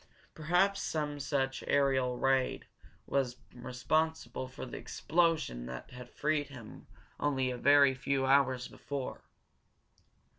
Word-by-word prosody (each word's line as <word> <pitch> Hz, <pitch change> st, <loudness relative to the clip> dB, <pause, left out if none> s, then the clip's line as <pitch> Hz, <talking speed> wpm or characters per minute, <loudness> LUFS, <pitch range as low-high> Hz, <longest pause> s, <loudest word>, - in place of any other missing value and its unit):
Perhaps 180 Hz, +5 st, +2 dB
some 150 Hz, -2 st, -2 dB
such 135 Hz, -1 st, -1 dB
aerial 130 Hz, -3 st, +2 dB
raid 135 Hz, 0 st, +1 dB, 0.4 s
was 125 Hz, -3 st, 0 dB, 0.2 s
responsible 130 Hz, +1 st, -1 dB
for 130 Hz, -, -8 dB
the 120 Hz, -, -8 dB
explosion 160 Hz, -, 0 dB
that 65 Hz, 0 st, -8 dB
had 125 Hz, -1 st, -10 dB
freed 150 Hz, -1 st, 0 dB
him 125 Hz, -6 st, -11 dB, 0.3 s
only 130 Hz, -3 st, +1 dB
a 125 Hz, -, -4 dB
very 140 Hz, -1 st, +6 dB
few 135 Hz, +1 st, -1 dB
hours 130 Hz, -2 st, +3 dB
before. 140 Hz, -2 st, -6 dB
135 Hz, 115 wpm, -32 LUFS, 125-145 Hz, 0.4 s, very